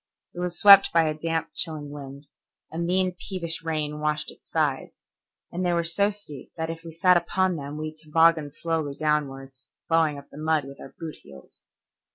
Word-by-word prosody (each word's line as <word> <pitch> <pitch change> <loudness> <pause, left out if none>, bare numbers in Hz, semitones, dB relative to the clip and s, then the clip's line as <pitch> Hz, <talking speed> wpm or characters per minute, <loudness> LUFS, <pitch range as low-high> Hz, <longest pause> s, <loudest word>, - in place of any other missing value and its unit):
It 175 - -8
was 175 -1 -3
swept 200 -1 +8
by 165 -1 +3
a 155 - 0
damp, 165 +1 -3
chilling 155 -4 +1
wind; 140 0 -9 0.5
a 160 - -5
mean, 185 +2 +1
peevish 170 -4 -4
rain 155 -2 -3
washed 150 0 -2
its - - -21
sides, - - -1 0.6
and 180 +2 -3
they 175 -1 +1
were 170 0 +1
so 185 +5 +2
steep 200 -10 -10
that 160 0 -2
if 165 0 -9
we 165 - -9
sat 180 +2 +4
upon 185 +1 0
them 145 -1 -6
we 155 0 -5
tobogganed 155 -1 +2
slowly 160 -4 -2
downward, 140 -3 -1 0.4
ploughing 160 -3 +2
up 140 0 -13
the 145 - -11
mud 155 -2 +1
with 140 0 -11
our - - -12
boot 160 -2 -7
heels. 70 -1 -17
160 Hz, 190 wpm, -25 LUFS, 150-170 Hz, 0.6 s, swept